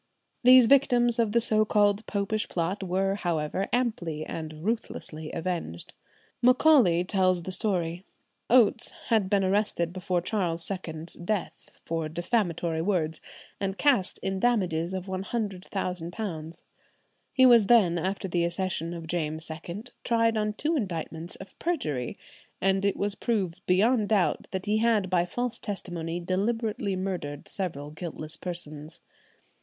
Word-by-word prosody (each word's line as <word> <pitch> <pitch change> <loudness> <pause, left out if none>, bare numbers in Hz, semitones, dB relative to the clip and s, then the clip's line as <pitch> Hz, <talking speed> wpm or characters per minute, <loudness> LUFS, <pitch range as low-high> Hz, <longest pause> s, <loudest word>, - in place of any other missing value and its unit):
These 255 0 +9
victims 240 -2 +4
of 225 -3 +2
the 235 - +4
so 215 -2 +3
called 205 0 +2
Popish 210 +1 -1
Plot 180 +4 -1
were, 190 +1 0
however, 175 -1 -1
amply 175 -11 -1
and 155 0 -6
ruthlessly 160 -8 -3
avenged. 165 - -4 0.5
Macaulay 250 - +5
tells 185 -2 +1
the 185 - -5
story. 180 -3 0 0.5
Oates 235 -1 +4 0.2
had 215 -5 +2
been 200 -1 +3
arrested 185 -3 0
before 185 -1 -1
Charles 175 -3 -1
II's 165 -3 -5
death 185 +2 -4
for 165 -1 -2
defamatory 175 -2 -1
words, 165 -4 0 0.4
and 195 0 -2
cast 265 -11 +2
in 190 0 -1
damages 185 -7 +1
of 185 -1 -4
£100,000. 185 -3 -4 0.7
He 260 - +5
was 235 -5 +7
then, 195 -8 +5
after 190 +3 -2
the 175 -1 0
accession 170 -1 -2
of 165 -1 -7
James 160 -1 -3
II, 170 +6 -6 0.2
tried 230 -1 +2
on 210 -1 0
two 305 +9 -1
indictments 170 - -4
of 195 - -13
perjury, 150 - -2 0.4
and 195 +1 +2
it 200 - +1
was 205 0 +1
proved 195 -5 -2
beyond 210 +4 +3
doubt 205 -5 +1
that 190 0 -4
he 215 +1 +2
had 220 -5 +2
by 175 -1 +3
false 245 +6 -3
testimony 175 -4 -4
deliberately 205 +2 -1
murdered 180 -7 -4
several 150 -7 -4
guiltless 155 -1 -7
persons. 160 -3 -7
190 Hz, 135 wpm, -27 LUFS, 170-215 Hz, 0.7 s, These